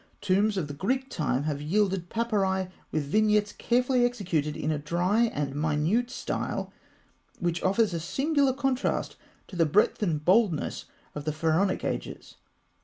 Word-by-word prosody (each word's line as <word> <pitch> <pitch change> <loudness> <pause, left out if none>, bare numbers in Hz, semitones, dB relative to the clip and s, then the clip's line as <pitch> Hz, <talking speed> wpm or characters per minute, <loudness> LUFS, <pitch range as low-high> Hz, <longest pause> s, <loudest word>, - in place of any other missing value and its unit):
Tombs 205 +1 +2
of 165 -6 -1
the 145 - -6
Greek 260 - -2
time 140 -4 -1
have 145 -2 -2
yielded 190 +2 0
papyri 195 -5 0 0.2
with 155 - 0
vignettes 210 +5 +2
carefully 250 +1 +1
executed 175 -11 -1
in 155 - -1
a 150 - -1
dry 175 +9 +1
and 145 -10 -2
minute 155 - +1
style - - -4 0.6
which 175 -1 -1
offers 200 +1 +2
a 170 - -1
singular 275 - +1
contrast 265 -1 -1 0.3
to - - -10
the 165 -2 +3
breadth 205 +9 +2
and 155 -7 -1
boldness 190 -4 +2 0.3
of 145 -1 -6
the 155 - 0
Pharaonic 165 +5 +1
ages. - - -5
190 Hz, 150 wpm, -27 LUFS, 155-220 Hz, 0.6 s, the